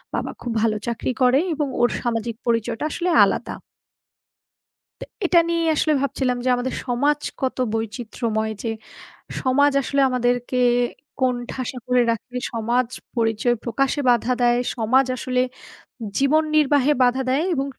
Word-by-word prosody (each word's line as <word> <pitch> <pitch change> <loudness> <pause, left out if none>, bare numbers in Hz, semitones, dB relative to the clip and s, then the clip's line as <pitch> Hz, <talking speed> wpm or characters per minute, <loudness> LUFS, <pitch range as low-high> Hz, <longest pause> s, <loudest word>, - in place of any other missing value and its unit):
বাবা - - -2
খুব 240 - -4
ভালো 220 -1 +2
চাকরি 235 +2 -2
করে 255 +2 +5
এবং 295 -1 -1
ওর 240 - +4
সামাজিক 230 -1 -2
পরিচয়টা 230 +1 0
আসলে 355 +3 -1 0.2
আলাদা।" - - -2 1.5
তো - - -5 0.2
এটা 345 - +4
নিয়েই 335 -1 0
আসলে 310 0 +1
ভাবছিলাম 260 -2 -1
যে 255 - +1
আমাদের 250 +1 -3
সমাজ 285 +4 +1 0.2
কত 260 -1 -1 0.2
বৈচিত্র্যময় 220 0 -2
যে 230 - -2 0.7
সমাজ 285 +2 +3
আসলে 280 +2 0
আমাদেরকে 245 0 0 0.6
কোণঠাসা 250 0 -2
করে 250 0 +3
রাখে, 230 +2 -5 0.2
সমাজ 235 +2 0 0.3
পরিচয় 225 +1 +1
প্রকাশে 275 +4 0
বাধা 240 +1 +2
দেয়, 240 0 +4 0.2
সমাজ 250 +4 +3
আসলে 250 0 -1 0.8
জীবন 295 +3 +3
নির্বাহে 290 -1 +3
বাধা 250 +2 +2
দেয় 275 +5 +2
এবং 270 -2 -1
250 Hz, 135 wpm, -22 LUFS, 235-275 Hz, 1.5 s, করে